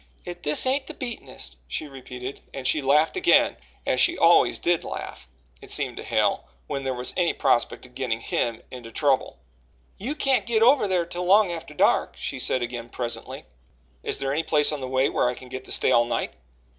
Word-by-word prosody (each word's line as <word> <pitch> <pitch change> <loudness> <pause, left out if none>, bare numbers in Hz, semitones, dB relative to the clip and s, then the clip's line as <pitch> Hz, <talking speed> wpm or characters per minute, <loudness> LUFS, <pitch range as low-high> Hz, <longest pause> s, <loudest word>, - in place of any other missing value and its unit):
If 175 0 -7
this 150 - +2
ain't 270 +1 +1
the - - -7
beatenest!" 220 - -6
she 150 - -4
repeated, 130 -1 -8
and 135 -1 -6
she 150 - +3
laughed 145 +4 +3
again, 375 - +4 0.3
as - - +1
she - - +4
always - - +5
did 175 -1 +1
laugh, 60 - -7 0.3
it - - -11
seemed - - -1
to - - -6
Hale, - - +1 0.2
when 135 - -4
there 130 -1 -2
was 125 0 -3
any 175 -2 +2
prospect 120 - +1
of 125 - -17
getting 120 -4 -2
him 115 0 -2
into 120 -3 -9
trouble. 140 +2 0 0.6
"You 255 +10 -3
can't 270 -5 +2
git 225 -2 +3
over 250 -3 +5
thar 180 -3 +1
till 175 +1 -5
long 200 0 +5
atter 160 -3 -7
dark," - - +2
she - - -4
said 130 - +1
again 120 -1 -5
presently. 120 -1 -5 0.6
"Is - - -2
there 135 0 -2
any 155 - +1
place 150 -2 +3
on 150 -2 -4
the 130 - -4
way 130 +1 +2
where 125 - +1
I 125 - -3
can 125 - -12
get 130 0 -7
to - - -10
stay - - +3
all 120 -1 +5
night?" 120 - -2
140 Hz, 205 wpm, -25 LUFS, 125-175 Hz, 0.6 s, always